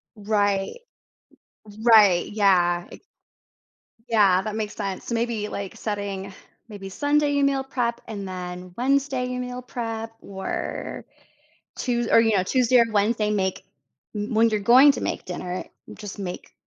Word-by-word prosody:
Right, 205 - 0 0.9
r 210 - -12
right, 210 -7 +6
yeah 180 -4 +2
i - - -11 1.1
Yeah, 200 -5 +4
that 215 +1 -5
makes 215 -1 -4
sense, 195 -3 -4
s - - -7
maybe, 230 -2 -1
like, 200 -2 -6
setting 200 -2 -4 0.4
maybe 195 -2 -8
Sunday 290 +5 +1
meal 275 -1 +1
prep 240 -3 -2
and, 200 -3 -6
then, 180 -1 -7
Wednesday 265 0 +1
meal 250 0 -5
prep 225 -2 -5
or 195 -1 -5 0.7
Tues 240 -2 -1
or, - - +7
you 225 -2 +3
know, 185 - +2
Tuesday 250 +4 +3
or 235 - +5
Wednesday 210 +1 +1
make 190 -2 -1 0.5
m 210 +3 -3
when 225 +1 +4
you're 215 - 0
going 255 +7 +7
to - - -5
make - - -3
dinner, 180 0 -5 0.3
just 205 -1 -9
make, 180 -2 -6
215 Hz, 145 wpm, -24 LUFS, 195-240 Hz, 1.1 s, or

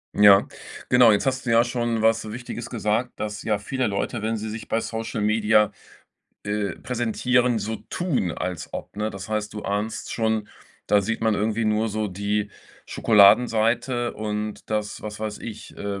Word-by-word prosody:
Ja. 100 -1 +7 0.4
Genau, 125 -2 +7
jetzt 105 - +1
hast 130 -1 -1
du - - +1
ja 115 0 +5
schon 120 -2 -1
was 110 -1 +2
Wichtiges 120 +1 -6
gesagt, 115 +2 -1
dass, 105 -1 -4
ja, 105 -2 0
viele 130 +5 -2
Leute, 105 +3 -2
wenn 110 +1 -1
sie 110 +1 -5
sich 110 +1 -7
bei 115 - +1
Social 115 0 -4
Media, 105 0 +3 0.7
äh, 105 0 -2
präsentieren, 125 0 +1
so 110 +2 -3
tun, 160 - -1
als 90 0 -4
ob, - - -7
ne? 105 +1 -1
Das 95 0 -8
heißt, 105 0 -2
du 105 - -5
ahnst 105 +2 -3
schon, 110 -2 0 0.4
da 105 - +4
sieht 115 +3 -3
man 110 - +3
irgendwie 110 +2 0
nur 110 +1 +1
so 110 0 -2
die 100 +2 -2 0.3
Schokoladenseite 115 +3 +3
und, 105 0 -4
dass 105 -1 -2
was 105 0 -7
weiß 110 -1 -4
ich, 110 -2 -9
äh, 100 -1 -4
110 Hz, 175 wpm, -24 LUFS, 105-115 Hz, 0.7 s, Ja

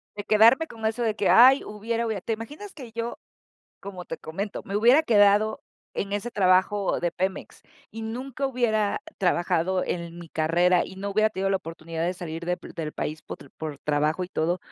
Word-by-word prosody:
de 205 - -5
quedarme 230 +9 +5
con 225 -5 -8
eso 225 +2 -1
de 220 -2 0
que: 200 - +1
"Ay, 260 +4 +7
hubiera, 225 +3 -3
hubiera", 220 -3 -2
¿te 225 - -2
imaginas 295 - -8
que 255 -6 -10
yo, 230 +1 -4 0.6
como 190 -2 -8
te 165 - -6
comento, 195 +6 -5
me 200 - -6
hubiera 245 +8 +6
quedado 210 -2 +4 0.3
en 200 0 -3
ese 205 +4 -2
trabajo 190 +1 +2
de 175 -1 -1
Pemex 190 +1 -4 0.3
y 225 0 -7
nunca 255 +4 -4
hubiera 220 -5 0 0.2
trabajado 180 0 +1
en 170 -1 -4
mi 170 -1 -10
carrera 170 +3 +2
y 190 - -10
no 200 +1 -4
hubiera 215 +2 +3
tenido 195 -1 -1
la 195 - +3
oportunidad 165 -2 -6
de 180 +2 -1
salir 170 -2 -6
de 180 0 0
p - - -12
del 155 -3 -4
país 155 +1 -4
potr 140 - -10
por 155 -3 -6
trabajo 150 +4 0
y - - -10
todo, 175 0 0
200 Hz, 195 wpm, -25 LUFS, 175-225 Hz, 0.6 s, Ay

